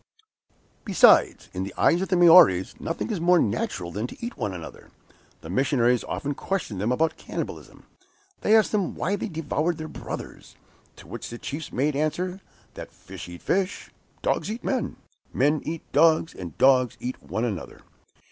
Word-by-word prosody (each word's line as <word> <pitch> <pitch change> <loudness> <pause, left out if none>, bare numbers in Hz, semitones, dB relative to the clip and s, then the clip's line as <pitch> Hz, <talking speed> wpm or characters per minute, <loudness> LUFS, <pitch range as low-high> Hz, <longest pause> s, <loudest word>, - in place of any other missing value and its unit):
Besides, 200 -5 +4
in 95 - -3
the 95 - -7
eyes 170 - +3
of 190 - -1
the 185 - +2
Maories, 170 - +6
nothing 165 +7 -3
is 195 -6 -2
more 175 +1 +5
natural 100 - -1
than 105 +6 -3
to - - -11
eat 235 +1 -5
one 105 -7 -3
another. 85 -3 -10 0.5
The 80 - -10
missionaries 125 +1 +2
often 145 +1 -3
questioned 140 - -3
them 110 +4 0
about 160 +5 +1
cannibalism. - - -7 0.5
They 215 - +3
asked 220 - +2
them 200 -4 -1
why 195 +5 -1
they 205 - -4
devoured 160 -1 -2
their 155 -1 -6
brothers; - - -8 0.4
to - - -15
which - - -7
the 120 - -7
chiefs 145 +4 -6
made 140 +3 0
answer 180 +6 -2 0.3
that - - -9
fish - - -11
eat 85 0 -11
fish, 190 0 -1 0.3
dogs - - 0
eat 225 +3 -5
men, 260 -3 -2 0.4
men 145 +3 +2
eat 165 0 -4
dogs, 160 0 +4
and 85 -5 -9
dogs 130 -2 +4
eat 125 +1 -5
one 95 - -3
another. 100 -8 -6
150 Hz, 170 wpm, -25 LUFS, 115-180 Hz, 0.5 s, Maories